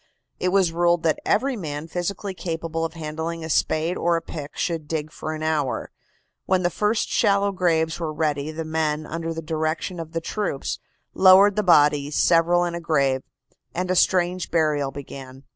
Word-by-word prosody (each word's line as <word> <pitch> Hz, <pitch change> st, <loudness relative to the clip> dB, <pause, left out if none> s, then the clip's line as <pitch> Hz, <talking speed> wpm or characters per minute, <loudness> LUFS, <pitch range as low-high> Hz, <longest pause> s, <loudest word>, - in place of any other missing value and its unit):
It 180 Hz, -, +1 dB
was 190 Hz, -2 st, +3 dB
ruled 170 Hz, 0 st, +2 dB
that 160 Hz, -2 st, +1 dB
every 265 Hz, +4 st, +2 dB
man 155 Hz, -6 st, -5 dB
physically 190 Hz, +3 st, -3 dB
capable 165 Hz, -2 st, -4 dB
of 165 Hz, 0 st, -3 dB
handling 160 Hz, +1 st, -5 dB
a 160 Hz, -, -3 dB
spade 160 Hz, +4 st, +1 dB
or 170 Hz, 0 st, +2 dB
a 165 Hz, -, -1 dB
pick 150 Hz, -2 st, -8 dB
should 165 Hz, -4 st, -2 dB
dig 155 Hz, -1 st, -3 dB
for 155 Hz, -, -5 dB
an 155 Hz, -, -6 dB
hour. 150 Hz, -4 st, -1 dB, 0.6 s
When 185 Hz, -1 st, +2 dB
the 175 Hz, -, +1 dB
first 210 Hz, +4 st, 0 dB
shallow 200 Hz, -2 st, +2 dB
graves 165 Hz, -4 st, +1 dB
were 165 Hz, -2 st, -2 dB
ready 150 Hz, -2 st, -1 dB
the 160 Hz, +1 st, -5 dB
men, 155 Hz, -1 st, -1 dB
under 165 Hz, +1 st, -4 dB
the 165 Hz, 0 st, -5 dB
direction 160 Hz, +2 st, -2 dB
of 165 Hz, 0 st, -7 dB
the 165 Hz, -, 0 dB
troops, 170 Hz, -4 st, -3 dB, 0.3 s
lowered 190 Hz, +2 st, +7 dB
the 210 Hz, -, +2 dB
bodies, 150 Hz, -5 st, +4 dB
several 175 Hz, +1 st, +4 dB
in 175 Hz, -, -3 dB
a 170 Hz, -, -4 dB
grave, 140 Hz, -5 st, +1 dB, 0.5 s
and 180 Hz, +1 st, -1 dB
a -, -, +1 dB
strange 180 Hz, 0 st, +2 dB
burial 150 Hz, -4 st, +1 dB
began. 135 Hz, -1 st, -10 dB
165 Hz, 180 wpm, -23 LUFS, 155-180 Hz, 0.6 s, lowered